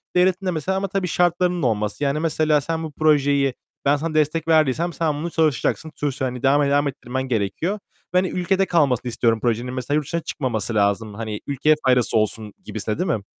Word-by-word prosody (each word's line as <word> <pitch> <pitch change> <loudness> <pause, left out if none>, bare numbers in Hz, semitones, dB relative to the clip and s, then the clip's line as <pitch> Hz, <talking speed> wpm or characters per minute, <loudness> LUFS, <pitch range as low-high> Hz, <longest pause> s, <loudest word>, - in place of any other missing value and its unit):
devletin 185 +1 +3
de 185 - +1
mesela 180 +4 -1
ama 195 +1 -1
tabii 190 -1 -2
şartlarının 175 +1 +1
olması. 105 +2 -1
Yani 140 +2 +1
mesela 155 -2 +2
sen 165 +3 -3
bu 160 - -5
projeyi 145 -3 +2 0.3
ben 140 +1 +4
sana 155 +2 -3
destek 155 +1 +1
verdiysem 160 +1 +2
sen 160 +1 0
bunu 160 +4 -3
çalışacaksın, 160 0 0
sonuçta 140 -2 -2
hani 125 0 -5
devam 140 +2 +4
et 140 - +1
devam 145 0 +3
ettirmen 130 -1 -4
gerekiyor 130 - -1 0.4
ve - - +3
hani 185 +1 +3
ülkede 185 +2 +1
kalmasını 135 -9 +1
istiyorum 115 -1 +1
projenin. 120 +1 -1
Mesela 130 +3 -2
yurt 150 -1 0
dışına 170 +5 -2
çıkmaması 120 -8 -3
lazım. 100 +1 +1
Hani 110 0 -5
ülkeye 145 +2 +3
faydası 125 -3 +3
olsun 110 -1 -1
gibisinden, 110 0 -3
değil 180 - 0
mi? 100 - -13
145 Hz, 195 wpm, -22 LUFS, 125-165 Hz, 0.4 s, ben